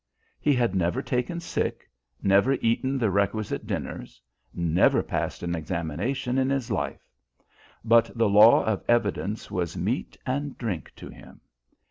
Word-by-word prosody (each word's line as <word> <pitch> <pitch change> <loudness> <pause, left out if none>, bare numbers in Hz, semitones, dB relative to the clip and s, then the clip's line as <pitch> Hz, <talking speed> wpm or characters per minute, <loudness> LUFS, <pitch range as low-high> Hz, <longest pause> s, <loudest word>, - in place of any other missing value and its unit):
He 145 -2 +2
had 120 -3 +1
never 95 +8 0
taken 125 +7 -2
sick, 170 - -3 0.4
never 100 +7 +4
eaten 130 +2 0
the 115 -6 +1
requisite 100 +2 -1
dinners, - - -5 0.3
never 85 0 +2
passed - - -3
an 85 0 -2
examination 90 - -2
in 130 0 +1
his 135 -3 -1
life; - - -3 0.8
but 115 0 +5
the 115 -1 +3
law 105 +3 +7
of 110 -3 -1
evidence 105 -2 0
was 85 -2 -2
meat 110 +9 -2
and 140 +2 -3
drink 100 -10 -4
to - - -10
him. - - -14
115 Hz, 140 wpm, -26 LUFS, 95-130 Hz, 0.8 s, law